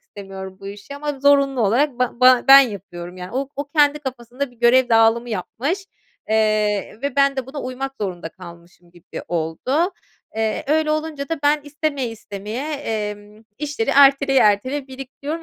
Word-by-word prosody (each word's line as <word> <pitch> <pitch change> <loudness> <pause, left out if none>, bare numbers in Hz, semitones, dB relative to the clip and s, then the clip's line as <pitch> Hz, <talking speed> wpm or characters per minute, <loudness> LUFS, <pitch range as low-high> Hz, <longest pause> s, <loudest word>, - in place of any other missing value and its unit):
istemiyorum 190 -1 -10
bu 195 - -10
işi 205 +7 -10
ama 290 -2 -5
zorunlu 280 -2 +3
olarak 245 +5 +1
ba 250 -1 +1
ba 255 -1 +6
ben 275 0 +11
yapıyorum. 185 -7 -5
Yani 180 0 -8
o 265 +2 -2
o 285 - -3
kendi 295 -1 +3
kafasında 255 -1 -6
bir 245 - -22
görev 245 +1 +4
dağılımı 225 +1 +3
yapmış, 275 - -3 0.4
eee, 215 -1 +1
ve 280 -1 -3
ben 275 0 +3
de 265 -1 -3
buna 285 +2 -7
uymak 265 +2 -5
zorunda 180 -5 -4
kalmışım 170 0 -15
gibi 175 -1 -10
oldu. 175 - -1 0.4
Eee, 220 -1 -1
öyle 310 +1 +1
olunca 310 -2 -3
da 330 - -2
ben 295 +1 +3
istemeye 290 -3 -2
istemeye, 220 +6 -6
emm, 210 -5 -5
işleri 290 -6 -2
erteleye 275 -1 +5
erteleye 255 +7 +1
biriktiriyorum 275 +4 -7
255 Hz, 160 wpm, -21 LUFS, 210-280 Hz, 0.4 s, ben